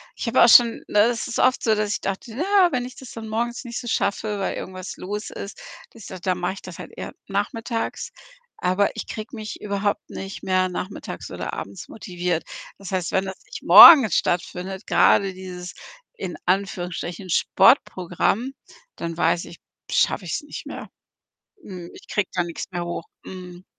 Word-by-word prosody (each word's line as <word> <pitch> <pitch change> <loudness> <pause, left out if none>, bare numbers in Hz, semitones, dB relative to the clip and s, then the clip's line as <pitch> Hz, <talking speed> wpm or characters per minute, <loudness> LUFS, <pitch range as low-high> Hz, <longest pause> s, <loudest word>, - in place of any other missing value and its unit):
ich - - -5
habe 230 - +5
auch 235 - +7
schon 235 0 +6
ne, 205 - +4
es 240 0 -1
ist 235 - -3
oft 255 0 +3
so, 220 - +3
dass 210 -1 -1
ich - - -3
dachte: 195 +4 -4
„Na 310 - -1
ja, 390 -3 +4
wenn 250 -2 -1
ich 255 - -9
das 260 - -11
dann 225 -1 -8
morgens 235 +3 -2
nicht 240 -1 -5
so 240 - -8
schaffe, 210 0 -1
weil 195 - -2
irgendwas 185 0 -7
los 210 +3 -5
ist, 200 - -8 0.3
dass 230 -3 -12
i 185 - -7
dann 185 -1 -1
mach 180 +1 -1
ich 195 - -11
das 180 -2 -10
halt - - -9
eher - - -7
nachmittags.“ 225 +4 -3 0.5
Aber 185 +2 +1
ich - - -6
kriege 215 +3 -7
mich 215 -1 -7
überhaupt 200 0 -2
nicht 195 +1 -7
mehr 185 0 +2
nachmittags 185 +2 -6
oder - - -5
abends 100 0 -7
motiviert. 180 -5 -3 0.3
Das 195 -1 -9
heißt, 185 -3 -1
wenn 190 0 +2
das 190 0 -7
nicht - - -9
morgens 265 - +10
stattfindet, 180 +3 -2
grade 195 -1 +4
dieses 180 -1 -8 0.4
in 180 - -5
Anführungsstrichen 180 -1 -2
Sportprogramm, 185 +8 +2 0.5
dann 165 0 -4
weiß 170 0 +1
ich, 170 - -12 0.3
schaffe 190 - +1
ich's 165 - -2
nicht 295 - -9
mehr. - - -8 0.7
Mhm. 180 -3 -9
Ich - - -15
kriege 205 - -1
da 180 - +1
nix 170 -1 -6
mehr 175 -1 -3
hoch. 170 -1 -5 0.2
Mhm. 180 -1 -10
195 Hz, 185 wpm, -23 LUFS, 180-225 Hz, 0.7 s, morgens